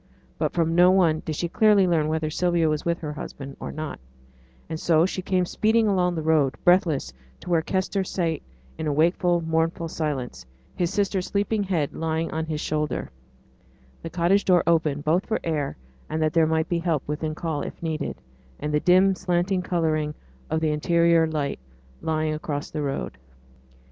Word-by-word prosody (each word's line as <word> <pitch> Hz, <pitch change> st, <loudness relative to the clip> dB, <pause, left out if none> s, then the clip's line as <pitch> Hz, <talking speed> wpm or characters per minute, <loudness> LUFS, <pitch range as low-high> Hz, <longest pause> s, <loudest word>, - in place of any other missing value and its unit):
But -, -, 0 dB
from 165 Hz, -1 st, +1 dB
no 175 Hz, +1 st, +6 dB
one 170 Hz, -4 st, +3 dB
did 155 Hz, -, -3 dB
she 170 Hz, -, -1 dB
clearly 205 Hz, +1 st, +4 dB
learn 160 Hz, -3 st, +2 dB
whether 155 Hz, 0 st, -1 dB
Sylvia 170 Hz, 0 st, +1 dB
was 155 Hz, -1 st, 0 dB
with 170 Hz, 0 st, -1 dB
her 150 Hz, -2 st, -4 dB
husband, 135 Hz, -2 st, -8 dB
or -, -, -5 dB
not; 155 Hz, -1 st, -5 dB, 0.7 s
and 160 Hz, -, -5 dB
so 165 Hz, -1 st, +3 dB
she 185 Hz, 0 st, -3 dB
came 185 Hz, -1 st, +1 dB
speeding 220 Hz, +4 st, +2 dB
along 180 Hz, -3 st, +2 dB
the 160 Hz, -, -3 dB
road, 155 Hz, -4 st, +2 dB
breathless, 175 Hz, -, +3 dB, 0.3 s
to 180 Hz, -, -6 dB
where 165 Hz, -2 st, +4 dB
Kester 190 Hz, +3 st, -1 dB
sate 170 Hz, -4 st, -2 dB, 0.4 s
in 150 Hz, -2 st, -1 dB
wakeful, 175 Hz, +2 st, +2 dB
mournful 165 Hz, +1 st, 0 dB
silence, 145 Hz, -, -3 dB, 0.3 s
his 175 Hz, -2 st, 0 dB
sister's 195 Hz, -2 st, 0 dB
sleeping 205 Hz, +1 st, 0 dB
head 175 Hz, -7 st, -1 dB
lying 160 Hz, 0 st, -2 dB
on 160 Hz, 0 st, -3 dB
his 155 Hz, -1 st, -3 dB
shoulder, 150 Hz, 0 st, -2 dB, 0.9 s
the 165 Hz, -, -6 dB
cottage 175 Hz, +4 st, +2 dB
door 180 Hz, -2 st, +4 dB
open, 160 Hz, -4 st, +2 dB
both 165 Hz, +6 st, +1 dB
for 220 Hz, -, 0 dB
air 150 Hz, -, -2 dB, 0.3 s
and 155 Hz, -, -2 dB
that 155 Hz, -1 st, +1 dB
there 165 Hz, -2 st, +4 dB
might 160 Hz, 0 st, +1 dB
be 175 Hz, -, 0 dB
help 165 Hz, -5 st, 0 dB
within 155 Hz, +1 st, -3 dB
call 160 Hz, -4 st, -3 dB
if -, -, -7 dB
needed; 160 Hz, -2 st, -2 dB, 0.4 s
and 150 Hz, +1 st, -3 dB
the 150 Hz, -, +3 dB
dim 185 Hz, +4 st, +5 dB
slanting 180 Hz, 0 st, 0 dB
oblong 155 Hz, -3 st, 0 dB, 0.3 s
of 160 Hz, -, 0 dB
the 155 Hz, -1 st, +1 dB
interior 170 Hz, +1 st, +3 dB
light 150 Hz, -, -2 dB, 0.4 s
lying 155 Hz, -1 st, 0 dB
across 150 Hz, -1 st, -4 dB
the 155 Hz, -, -3 dB
road. 65 Hz, -, -3 dB
165 Hz, 180 wpm, -25 LUFS, 155-180 Hz, 0.9 s, no